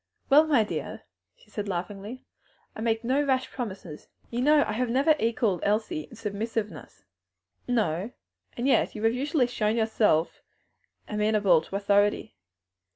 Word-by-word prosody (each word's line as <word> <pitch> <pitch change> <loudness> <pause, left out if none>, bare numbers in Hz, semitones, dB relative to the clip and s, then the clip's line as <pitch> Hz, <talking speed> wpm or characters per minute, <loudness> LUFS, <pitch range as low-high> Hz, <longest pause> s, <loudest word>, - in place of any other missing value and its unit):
"Well, 305 +3 +7
my 275 -8 +4
dear," 210 - -5 0.3
she - - -24
said 210 -1 -4
laughingly, 200 +6 -5 0.5
"I - - -7
make 225 0 0
no 265 +5 +1
rash 260 -2 0
promises. 195 - -7 0.2
You 240 +1 -2
know 295 +2 +5
I 220 +3 -1
never 265 +6 +2
have 305 - +1
equalled 225 -4 +1
Elsie 210 -7 -1
in - - -13
submissiveness." 215 - -5 0.6
"No; 215 -5 0 0.5
and 245 +2 -1
yet 275 - +2
you 215 - -6
have 225 +1 +3
usually 275 +1 +1
shown 220 -3 -1
yourself 220 -7 +1 0.7
amenable 210 -4 +2
to 190 - -9
authority." 205 +1 +1
220 Hz, 145 wpm, -27 LUFS, 205-250 Hz, 0.7 s, Well